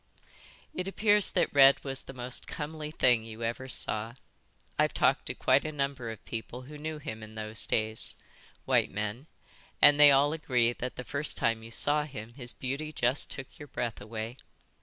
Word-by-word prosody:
"It 180 - -4
appears 205 0 +5
that - - 0
Red 140 -1 +6
was 135 -1 -1
the - - -10
most 125 -1 -3
comely 150 0 -6
thing 125 -7 +2
you 115 0 -9
ever 120 +3 -3
saw. 115 -2 -1 0.6
I've - - +2
talked - - +2
to - - -2
quite - - +3
a 155 - -4
number 140 -5 -3
of 110 - -9
people 120 +2 -6
who 150 +3 -11
knew 155 +1 -5
him 110 -7 -7
in 110 0 -11
those 110 -1 -5
days, 110 0 -2 0.5
white - - +2
men, 105 +7 -4 0.5
and 145 0 +6
they 145 -1 +10
all 140 +2 +4
agree 125 -7 +1
that 125 +1 -5
the 125 - -6
first 145 +3 +1
time 115 -1 +1
you 115 - -10
saw 150 +5 +3
him 120 -5 -9
his 125 -2 -5
beauty 140 +4 -4
just 130 -2 0
took 135 -1 -9
your 145 - -9
breath 120 -4 -4
away. 110 +3 -6
130 Hz, 185 wpm, -29 LUFS, 115-145 Hz, 0.6 s, they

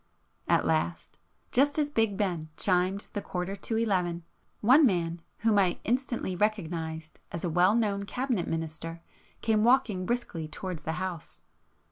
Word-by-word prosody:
At - - +3
last, 80 0 -1 0.3
just 285 +4 +3
as 295 -1 +1
Big 225 -7 +1
Ben 175 -7 -1
chimed 185 +1 +1
the 205 - -2
quarter 180 +1 -3
to 220 +3 -3
eleven, 180 -6 0 0.4
one 255 +8 +6
man 170 - +1 0.2
whom 220 -2 +4
I 185 -3 +2
instantly 240 -5 -1
recognised 165 -6 -2
as 170 - -5
a 175 - -1
well 180 +5 +4
known 200 -3 +1
Cabinet 245 -4 -1
minister, 165 +1 -4 0.4
came 215 -2 +3
walking 225 -7 +3
briskly 235 -10 -2
towards 170 +1 -5
the 160 - -3
House 180 -2 -5
190 Hz, 145 wpm, -29 LUFS, 165-225 Hz, 0.4 s, one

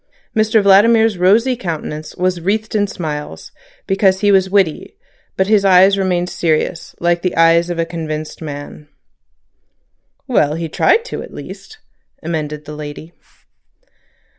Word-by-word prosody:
Mr 215 -1 +2
Vladimir's 215 +1 +4
rosy 225 +8 +3
countenance 155 -6 -6
was 180 -1 -1
wreathed 215 +5 -2
in 205 -1 +1
smiles, 150 -6 -6 0.3
because 195 -1 +1
he 205 -1 +3
was 190 -1 +3
witty, 195 - 0 0.4
but 190 - +2
his 210 0 +2
eyes 190 +1 +5
remained 180 -2 -1
serious, 165 -1 -2
like 170 0 +1
the 180 -1 -2
eyes 165 +1 +4
of 175 - -3
convinced 155 -2 -6
man. 145 0 -8 1.4
"Well, 155 - +1
he 165 0 -4
tried 460 - +2
to - - -6
at - - -11
least," 440 - -10 0.5
amended 150 -2 -4
the 150 - -8
lady. 150 +2 -9
180 Hz, 135 wpm, -17 LUFS, 160-200 Hz, 1.4 s, eyes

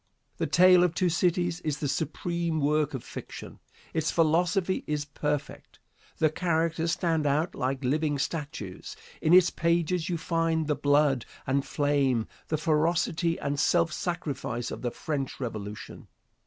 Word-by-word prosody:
"The - - -1
Tale 180 0 +6
of 175 -2 +1
Two 180 - +2
Cities" 175 0 +1
is 155 -4 -2
the 145 - -2
supreme 165 +3 -2
work 150 0 +1
of 130 - -6
fiction. - - -9 0.3
Its 160 -1 0
philosophy 175 +3 +2
is 150 -1 -1
perfect. 145 0 -4 0.4
The 155 -1 +3
characters 165 0 0
stand 165 -4 0
out 150 +5 +1
like 130 +2 -2
living 145 +3 +1
statues. 140 - -5 0.3
In 155 - +2
its 180 0 +7
pages 170 +1 0
you 175 - 0
find 165 -1 0
the 150 - +1
blood 145 -3 +2 0.2
and 135 +1 +1
flame, 140 -6 +1 0.2
the 155 - 0
ferocity 165 +1 +1
and 140 0 -2
self 170 +1 +2
sacrifice 140 -9 -3
of - - -6
the 125 - -1
French 140 +1 -4
Revolution. 105 -4 -6
155 Hz, 145 wpm, -28 LUFS, 145-170 Hz, 0.4 s, its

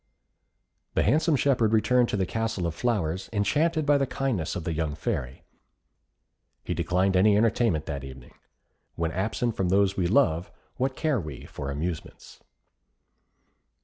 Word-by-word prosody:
The - - +3
handsome 155 +1 +3
shepherd 125 -6 +2
returned 120 +2 +3
to - - -1
the 95 - +1
Castle 110 -2 -2
of 85 - -1
Flowers, 95 -7 -1
enchanted 150 +10 +1
by 145 0 +4
the 135 - +1
kindness 125 -14 -2
of 90 - -4
the 80 - -2
young 80 -2 -2
Fairy. 65 -5 -4 1.2
He - - -2
declined 95 +2 +1
any 100 +2 +5
entertainment 110 -7 +2
that 70 -3 -5
evening. 65 -2 -11 0.6
When 85 -1 -1
absent 105 +5 -1
from 95 -2 0
those 100 +1 +2
we 90 -2 +1
love, 90 - +2 0.3
what 130 +1 -1
care 150 -4 0
we 75 -7 -7
for 70 - -6
amusements! 80 +3 -5
100 Hz, 145 wpm, -26 LUFS, 80-120 Hz, 1.2 s, any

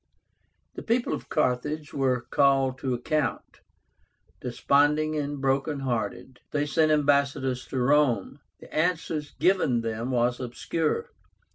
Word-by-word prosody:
The - - -7
people 235 +2 0
of - - -6
Carthage 150 +2 -1
were 130 -3 +1
called 135 -2 +3
to 130 -2 -1
account. 135 0 -2 0.8
Desponding 145 +5 +2
and 145 -1 -3
broken 135 +2 0
hearted, 125 0 -3
they 145 0 0
sent 155 +1 +2
ambassadors 140 -3 +1
to 135 - -5
Rome. 135 +1 +2 0.2
The - - -14
answer 160 -1 0 0.2
given 180 -11 +2
them 115 +2 -3
was 120 -1 +1
obscure. 140 +6 -2
140 Hz, 120 wpm, -26 LUFS, 125-150 Hz, 0.8 s, called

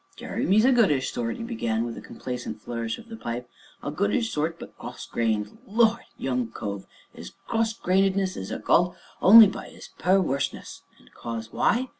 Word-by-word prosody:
"Jeremy 195 +4 0
is 215 - +5
a 265 - +6
good 235 -5 +5
ish 135 -3 0
sort," 115 -1 -2
he - - -6
began, 115 - -1
with 120 - -5
a - - -8
complacent 125 +3 -6
flourish 115 0 -4
of 230 - -13
the 225 - -8
pipe, 120 - -5 0.4
"a 145 - -3
good 200 +7 0
ish 230 -2 0
sort, 160 +2 -1
but - - -10
cross - - -8
grained 110 -2 -1
Lord! 225 +2 +2
young 125 -3 -1
cove, 100 -3 -6 0.3
'is - - -10
cross 225 -1 0
grainedness 190 0 +2
is 95 - -6
ekalled 175 +1 +2 0.3
only 220 +4 +10
by 195 - -4
'is - - -12
per 185 +4 +4
werseness, 140 -7 -2 0.2
and - - -23
'cause 115 -1 -6
why? 250 +2 +1
155 Hz, 190 wpm, -26 LUFS, -, 0.4 s, only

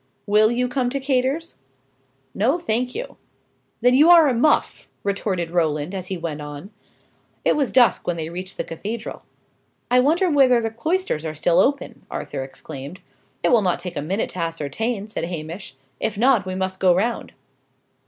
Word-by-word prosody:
"Will 210 +1 +4
you 245 +1 0
come 250 -1 -1
to 275 +2 -2
Cator's?" 270 +4 -1 0.8
"No, 255 - +2
thank 250 -4 -1
you." - - -6 0.6
"Then 250 0 +4
you 295 +6 +6
are 335 -3 +8
a 265 - +2
muff!" 280 +6 +1 0.2
retorted 190 -4 -2
Roland, 160 -1 0
as 185 -2 -5
he 190 - -3
went 160 -3 -5
on. 145 +6 -8 0.7
It - - +4
was 280 -4 0
dusk 245 -2 +4
when 175 -1 0
they 160 -1 -3
reached 185 +3 -6
the - - -1
cathedral. 215 +7 -6 0.7
"I 250 - +6
wonder 320 +8 +3
whether 270 -6 +5
the 225 -1 -2
cloisters 315 - -1
are 155 -1 -4
still 170 +3 +2
open!" 280 +1 0
Arthur - - -5
exclaimed. 135 +4 -8 0.4
"It - - +3
will 235 - +5
not 180 -3 +1
take 175 -1 -7
a - - -2
minute 185 +8 -2
to 185 - -7
ascertain," 170 - -2
said 210 -6 -4
Hamish. 170 -1 -6 0.2
"If 210 - -2
not, 235 -4 +3
we 185 - -3
must 190 0 -3
go 180 -2 +4
round." 230 +6 -1
205 Hz, 175 wpm, -22 LUFS, 170-250 Hz, 0.8 s, are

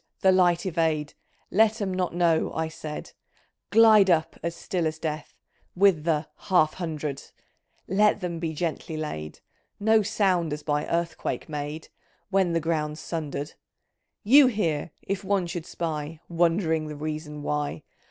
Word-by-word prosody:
the 190 - +6
light 180 -1 +3
evade! 160 -4 0 0.4
Let 220 +2 +3
'em 195 -3 -1
not 180 -2 -1
know," 170 -2 +2
I 160 0 -1
said; 155 -1 -7 0.6
"Glide 215 -3 +7
up 160 -2 +2
as 170 0 -3
still 175 -2 -2
as 155 0 -3
death, 155 -2 -5 0.4
With 180 -5 +4
the 155 -2 +1
' - - -46
Half 155 -5 +4
hundred 155 -5 -4
I - - -17 0.4
' - - -42
Let 210 0 +4
them 170 -2 -4
be 165 -1 -2
gently 160 0 -3
laid! 75 - -5 0.4
No 220 +1 +4
sound 190 -6 +1
as 150 - -6
by 150 -1 -1
earthquake 170 -1 -2
made 150 0 -5 0.4
When 190 -3 +2
the 165 - +2
ground's 155 -1 -2
sunder'd! 150 -2 -4 0.7
You 270 +6 +7
here, 170 -11 -1
if 195 +1 -3
one 195 -1 +1
should 170 -1 -5
spy. 155 -1 -4
Wondering 165 -2 +1
the 150 - -6
reason 150 0 -5
why 150 0 -2
165 Hz, 155 wpm, -26 LUFS, 155-185 Hz, 0.7 s, Glide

